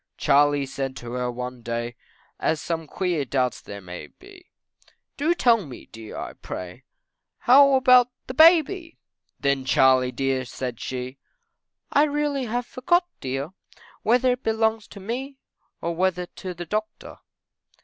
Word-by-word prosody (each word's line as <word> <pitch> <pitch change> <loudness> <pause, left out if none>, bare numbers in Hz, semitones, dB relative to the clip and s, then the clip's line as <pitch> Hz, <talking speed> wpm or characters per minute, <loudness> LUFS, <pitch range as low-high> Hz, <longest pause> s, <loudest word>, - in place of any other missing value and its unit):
Charley 145 0 +3
said 135 0 -4
to 120 -2 -8
her 125 0 -2
one 125 0 -6
day, 120 +1 -4 0.4
As 160 - 0
some 165 -1 -3
queer 175 -3 -1
doubts 130 -2 -1
there 100 0 -9
may 90 -1 -8
be, 380 -1 -17 0.7
Do 315 +5 +1
tell 235 - +3
me 135 -6 -10
dear, 110 -1 -10
I - - -6
pray, 90 -1 -8 0.5
How 275 +2 +6
about 255 -1 +6 0.2
the 255 - -6
baby? 330 +3 +4 0.4
Then 140 -1 +1
Charley 130 -1 +4
dear, 135 0 -1
said 125 -1 -6
she, 130 +1 -5 0.7
I 290 - +5
really 290 -2 -1
have 240 +1 -2
forgot 345 +9 +1
dear, 135 +4 -4 0.5
Whether 250 +3 +3
it 250 +1 -2
belongs 220 -1 0
to 200 - -12
me, 255 +7 -5 0.4
Or 170 - -2
whether 180 0 0
to 180 +1 -8
the 175 0 -6
doctor. 215 +4 -4
175 Hz, 145 wpm, -24 LUFS, -, 0.7 s, How